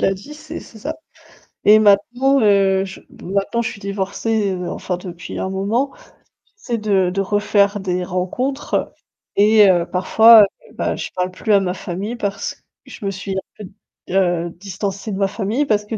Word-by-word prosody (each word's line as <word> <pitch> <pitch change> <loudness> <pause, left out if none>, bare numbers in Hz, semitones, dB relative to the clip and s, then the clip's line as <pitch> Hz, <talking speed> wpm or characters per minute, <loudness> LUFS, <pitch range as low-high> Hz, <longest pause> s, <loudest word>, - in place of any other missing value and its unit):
l'a 195 - +2
dit, 200 +11 -9
c'est 310 +1 -8
c'est 220 - -14
ça 300 +9 -4 0.7
et 215 +1 +8
maintenant, 245 +7 +3
heu, 195 -2 +3
je 190 -1 -9 0.2
maintenant 200 +5 -1
je 225 - -2
suis 200 - -11
divorcée, 200 +1 -1
heu, 180 -1 -4
enfin 180 - -3
depuis 175 -1 -8
un 190 - -2
moment, 210 +8 -1 0.6
j'essaie 245 - -3
de 195 -4 +1
de 195 +2 -2
refaire 205 0 +1
des 180 -1 -2
rencontres 190 +11 -2 0.4
et 210 0 +6
heu, 175 -2 +3
parfois, 220 +5 +7
heu, 200 - -4
bah, - - -1
je - - -5
parle 180 0 -1
plus 210 +3 -1
à 200 - +7
ma 190 -2 -1
famille 195 +5 -5
parce 200 -3 -4 0.2
je - - -11
me 195 - 0
suis 195 0 -6
un - - 0 0.2
peu 210 - -8
d 185 - -12 0.4
heu, 175 -3 +1
distancée 195 +3 -5
de 195 - -3
ma 195 - +2
famille 215 +7 -1
parce 210 -4 +1
que 225 - -5
200 Hz, 185 wpm, -19 LUFS, 190-220 Hz, 0.7 s, et